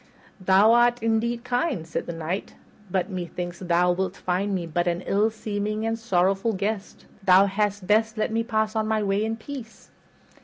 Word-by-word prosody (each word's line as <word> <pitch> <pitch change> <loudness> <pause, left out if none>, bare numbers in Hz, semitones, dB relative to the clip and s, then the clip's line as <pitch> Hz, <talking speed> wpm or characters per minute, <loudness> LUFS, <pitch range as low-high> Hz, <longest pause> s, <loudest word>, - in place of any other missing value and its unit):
"Thou 195 +4 +5
art 240 -1 +3
indeed 230 +1 0
kind," 250 - -1
said 165 - -4
the - - -3
Knight, 165 +4 -4 0.3
"but 190 +2 -1
methinks 175 -1 -5
thou 180 0 +2
wilt 185 +1 -2
find 190 +2 -1
me 175 -2 -2
but 175 +2 -1
an 175 +1 0
ill 205 +3 +2
seeming 215 0 -3
and 225 0 -1
sorrowful 195 0 +1
guest. 200 +1 -4 0.2
Thou 190 0 +6
hadst 200 0 -1
best 220 +3 +2
let 215 - 0
me 225 +1 +1
pass 220 -1 -1
on 220 -1 0
my 215 -1 +1
way 200 +1 +1
in 220 +1 -1
peace." 230 -1 -10
205 Hz, 180 wpm, -25 LUFS, 185-225 Hz, 0.3 s, Thou